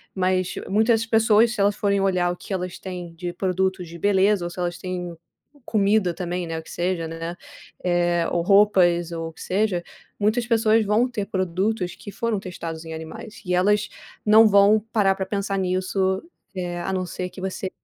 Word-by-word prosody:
Mas 185 -1 0
muitas 225 +2 +3
pessoas 225 0 +4
se 210 - -2
elas 200 +1 +3
forem 200 -1 +1
olhar 185 -2 +2
o - - -4
que - - -7
elas 180 -1 -4
têm 180 -3 -7
de 175 +1 -5
produtos 190 -1 -1
de 170 - -9
beleza 200 -1 +3
ou - - -3
se 180 - -9
elas 175 -1 -2
têm 180 -2 -5 0.5
comida 205 -3 +2
também, 175 0 -3
né, 165 0 -3
o - - -10
que - - -13
seja, 175 -2 -1
né, 165 +1 -5 0.5
eh, 175 -1 +1
ou 175 - +1
roupas 180 -4 +4
ou 165 -1 -4
o 165 - -14
que - - -14
seja, 190 -2 0 0.4
muitas 220 +4 +1
pessoas 225 -1 +3
vão 225 +5 +2
ter 215 -5 -3
produtos 185 +1 -1
que 205 - -10
foram 230 -2 -1
testados 165 -3 -6
em 160 - -6
animais, 160 +7 -9
e 180 - -1
elas 210 +3 +2 0.4
não 220 +1 +7
vão 205 +1 +5
parar 195 -3 +3
para 190 - -3
pensar 200 0 -2
nisso, 190 +1 0 0.3
eh, 175 -1 -3
a 190 - -3
não 185 -1 -1
ser 180 +1 -5
que 190 - -12
você 190 0 -3
190 Hz, 190 wpm, -23 LUFS, 175-205 Hz, 0.5 s, não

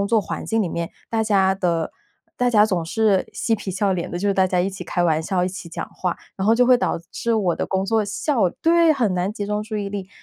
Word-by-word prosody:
工 200 - 0
作 230 - +4
环 - - -5
境 225 -1 +1
里 180 - -1
面， 170 0 -3 0.2
大 225 -1 +1
家 195 -3 +3
的 170 -4 -1 0.4
大 250 0 +2
家 210 -3 +5
总 185 -6 0
是 205 +2 +1
嬉 225 - 0
皮 205 -2 -5
笑 195 +1 0
脸 175 -2 -3
的， 175 - -3
就 200 - -2
是 200 - +3
大 190 -1 +3
家 185 -1 0
一 185 +2 +1
起 190 -1 -7
开 175 0 -1
玩 160 -2 +2
笑， 180 +2 0
一 180 - 0
起 185 -2 -8
讲 165 - -5
话， 180 -2 -3 0.2
然 195 - -2
后 225 - +6
就 250 +2 +4
会 255 0 +6
导 240 - 0
致 235 -1 -1
我 190 -6 +1
的 - - -3
工 190 0 -1
作 220 +2 +1
效 210 - 0
对， 335 0 +5
很 230 -8 +1
难 180 +2 0
集 210 -2 -4
中 210 +1 -2
注 215 0 -5
意 205 -1 -3
力， 195 -2 -5
200 Hz, 295 characters per minute, -22 LUFS, 180-220 Hz, 0.4 s, 后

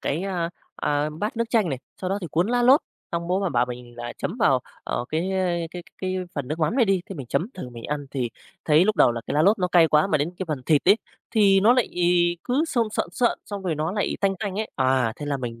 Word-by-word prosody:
cái, 160 +6 -1
a, 175 -3 -2 0.3
a, 145 +1 0
bát 210 +9 -4
nước 230 - +1
chanh 220 -6 +3
này, 135 -4 -2 0.2
sau 185 0 -2
đó 200 - 0
thì 175 - -4
cuốn 170 +4 +2
lá 245 0 +2
lốt, 260 +4 +6 0.3
xong 170 0 -2
bố 185 +2 +1
mà 195 - 0
bảo 125 -5 +1
mình 120 -1 -9
là 120 0 -5
chấm 200 - -3
vào, 135 - +4 0.2
ờ, 120 - -2
cái 170 +5 -1 0.4
cái 175 0 -7 0.2
cái 185 0 -2 0.2
phần 140 -4 -4
nước 155 +3 -3
mắm 160 +9 +1
này 250 - +5
đi, 195 -3 +2
thì 195 - -7
mình 135 -5 -7
chấm 165 - 0
thử 130 - -7
mình 120 -1 -10
ăn 145 -1 -3
thì 125 -4 -2 0.3
thấy 155 +2 +5
lúc 215 +1 +1
đầu 120 - +5
là 115 - -4
cái - - -3
lá 150 - +3
lốt 205 +5 +4
nó 180 - 0
cay 170 -2 +5
quá, 150 +2 +4
mà 160 -6 +1
đến 150 +4 -1
cái 190 - -2
phần 145 -4 -3
thịt 150 -3 +4
ấy 200 - +8 0.3
thì 200 -4 +5
nó 225 +5 +6
lại 250 -2 +2 0.6
cứ 270 +6 +1
sơn 235 -7 +1
sợn 190 - -2
sợn, 240 +3 +1
xong 200 -2 -5
rồi 175 -4 -1
nó 155 +4 -2
lại 205 -1 -1
tanh 195 -1 +2
tanh 200 -3 -3
ấy, 220 - -3
à, 130 -3 +2
thế 145 - -6
là 145 -1 0
mình 115 -3 -6
170 Hz, 275 wpm, -24 LUFS, 145-200 Hz, 0.6 s, ấy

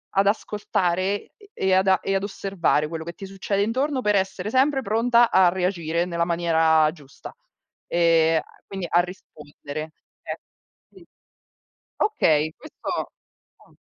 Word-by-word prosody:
ad 195 +1 +3
ascoltare 190 -4 0 0.3
e 410 -1 -20
e 190 0 +1
ad 190 0 +3
e 195 - -1
ad 195 - 0
osservare 195 -6 0
quello 160 0 -5
che 170 +1 -7
ti 195 - -9
succede 195 +1 -2
intorno 260 +4 -1
per 210 -2 +2
essere 190 +1 -1
sempre 270 +2 +2
pronta 235 +2 +3
a 185 -2 +6
reagire 175 -2 -1
nella 170 -1 -1
maniera 160 -2 +3
giusta, 145 -5 -13 0.5
ehm, 165 -1 +3
a - - -24
quindi 195 -3 -5
a 175 - +4
rispondere. 155 -3 -9 0.3
Ecco, - - -6 0.5
sì. 370 -3 -17 0.9
Okay, 155 - +2
questo 310 - -6 0.5
ah. - - -23
185 Hz, 140 wpm, -24 LUFS, 165-205 Hz, 0.9 s, a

